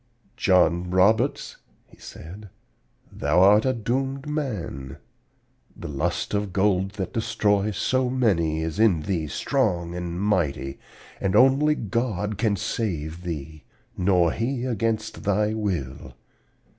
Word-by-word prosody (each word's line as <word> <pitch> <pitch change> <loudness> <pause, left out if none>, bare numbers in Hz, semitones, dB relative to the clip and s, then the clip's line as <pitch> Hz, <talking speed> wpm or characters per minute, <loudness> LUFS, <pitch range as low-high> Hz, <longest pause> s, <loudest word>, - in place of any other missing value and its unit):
"'John 90 -2 +2
Roberts,' 95 +4 +2 0.3
he - - -22
said, 95 +6 -11 0.6
'thou 75 +5 +1
art 105 +4 +6
a 130 - +2
doomed 135 +4 -2
man. 100 - -4 0.8
The - - -7
lust 70 +6 -2
of 105 -1 -1
gold 95 0 +1
that 95 -2 -5
destroys 105 -2 0
so 130 -1 +1
many 85 -11 +1
is 80 +4 -4
in 95 -9 +3
thee 80 -3 -2
strong 90 - -1
and 90 0 -4
mighty, 85 -9 -1 0.4
and 95 - 0
only 140 +4 +5
God 105 -3 -2
can 105 -2 +2
save 85 -6 -3
thee, 80 -3 -6 0.3
nor 90 -3 +3
He 125 +2 -2
against 115 -2 -2
thy 105 +2 +1
will. 90 -12 -4
100 Hz, 120 wpm, -24 LUFS, 85-110 Hz, 0.8 s, art